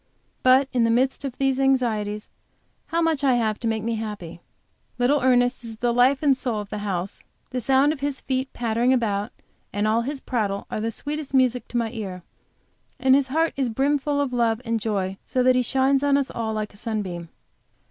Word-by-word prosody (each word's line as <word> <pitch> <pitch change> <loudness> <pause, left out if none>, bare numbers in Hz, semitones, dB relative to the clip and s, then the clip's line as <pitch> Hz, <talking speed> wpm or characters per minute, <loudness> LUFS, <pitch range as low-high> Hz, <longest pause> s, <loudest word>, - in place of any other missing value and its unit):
But 260 +2 +5
in 245 -2 +3
the 230 - +3
midst 255 +5 +1
of 260 -3 -5
these 270 -1 +1
anxieties, 220 -6 +1 0.6
how 335 0 0
much 320 -3 +1
I 265 -3 +4
have 220 -3 0
to 235 - -2
make 220 -1 -1
me 230 0 -1
happy! 210 -7 -6 0.6
Little 260 +4 +2
Ernest 245 -1 +2
is 225 -1 -8
the 240 +1 0
life 260 +4 +3
and 280 -2 +5
soul 245 -4 -2
of 205 -1 -7
the 210 - -3
house; 190 -2 -3 0.3
the 250 - -2
sound 270 +4 +3
of 305 - -9
his 285 -1 -2
feet 260 0 -2
pattering 235 +2 +1
about, 210 -5 0 0.4
and 205 +1 0
all 220 +2 +2
his 275 +4 -4
prattle, 205 -7 -2
are - - -2
the 225 - -1
sweetest 290 +4 -5
music 250 -2 +2
to 240 - -3
my 230 -2 0
ear; 190 -6 -6 0.8
and 260 0 +4
his 275 0 +4
heart 320 +5 +1
is 270 -3 0
brimful 285 +4 0
of 280 -3 -1
love 230 -2 +1
and 230 0 0
joy, 195 -3 -2
so 255 - 0
that 255 0 +5
he 250 - +3
shines 265 +2 +2
on 285 -1 +3
us 280 -1 -1
all 225 -1 -3
like 215 -1 -3
a - - -14
sunbeam. 195 -7 -4
245 Hz, 210 wpm, -24 LUFS, 220-270 Hz, 0.8 s, But